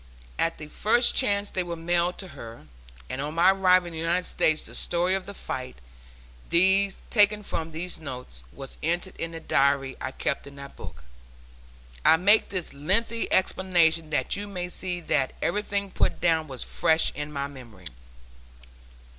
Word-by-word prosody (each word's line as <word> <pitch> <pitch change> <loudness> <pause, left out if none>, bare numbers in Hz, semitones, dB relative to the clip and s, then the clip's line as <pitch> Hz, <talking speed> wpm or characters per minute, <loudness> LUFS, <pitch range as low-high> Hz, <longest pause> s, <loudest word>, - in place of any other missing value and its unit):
At 165 0 0
the 155 - -8
first 235 +9 +3
chance 205 -5 +3
they 185 - -1
were 175 -1 -4
mailed 175 +1 0
to 190 - -7
her, 115 - -11 0.4
and 135 - -4
on 150 +2 -4
my 175 +3 +6
arrival 185 -2 +4
in 170 - -8
the 160 - -6
United 170 +2 0
States 155 -1 +1
the - - -10
story 175 +2 0
of 190 0 -2
the 200 - -7
fight, 130 -7 -6 1.4
taken 210 -1 +4
from 165 -4 -4
these 170 +3 -4
notes, 125 - -7
was 135 - -9
entered 175 +4 -2
in 165 - -4
the 165 0 -7
diary 140 -3 +1
I 130 - -3
keep 140 - -2
in 140 0 -12
a 140 0 -9
book. 60 - -11 1.0
I 160 - +6
make 205 +5 +4
this 185 -6 -3
lengthy 205 +11 -1
explanation 170 -4 +3
that 140 -4 0
you 205 +1 -5
may 180 -3 -4
see 180 -1 -3
that 140 -5 0
everything 200 -1 -1
put - - 0
down 160 -2 +1
was 130 -3 -6
fresh 160 0 +1
in 150 0 -5
my 140 -1 -3
memory. 120 -10 -12
165 Hz, 170 wpm, -26 LUFS, 140-185 Hz, 1.4 s, my